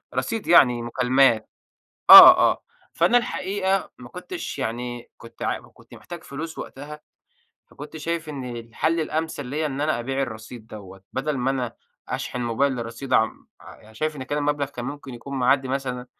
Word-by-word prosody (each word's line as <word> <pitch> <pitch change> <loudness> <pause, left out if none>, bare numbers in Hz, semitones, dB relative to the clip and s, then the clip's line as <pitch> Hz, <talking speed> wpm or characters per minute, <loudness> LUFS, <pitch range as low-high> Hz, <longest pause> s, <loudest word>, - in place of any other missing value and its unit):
رصيد 225 -2 -3
يعني 125 -8 +5
مكالمات. 125 -1 +2 0.6
آه، - - +12
آه. - - -7 0.3
فأنا 245 - +3
الحقيقة 195 -4 -2
ما 120 -1 -12
كنتش 180 - -7
يعني 120 0 -5
كنت 115 - -15
عا - - -1
كنت - - -20
محتاج 175 -2 -10
فلوس 160 +3 -7
وقتها، 150 +3 -9 0.7
فكنت 150 +2 -11
شايِف 165 +1 -4
إن 130 -5 -6
الحل 120 +8 -2
الأمثَل 155 -3 -3
ليَّا 150 +4 -2
إن 140 0 -5
أنا 150 -4 0
أبيع 135 +3 -2
الرصيد 110 -2 -8
دوَّه، 95 -3 -12
بدل 140 +2 -2
ما 130 +2 0
أنا 125 -3 -3 0.3
أشحن 125 - -4
الموبايل 120 +1 -1
رصيد، 130 +4 -8
عم 110 - 0
ع - - -13
يعني، 110 +1 -19
شايِف 155 +5 -3
إن 130 - -6
كده 145 +3 -3
المبلَغ 145 -1 -1
كان 125 -3 -8
ممكن 140 -2 -7
يكون 135 +3 -7
معدِّي 130 +1 +2
مثلًا 130 -2 -4
135 Hz, 165 wpm, -23 LUFS, 120-150 Hz, 0.7 s, آه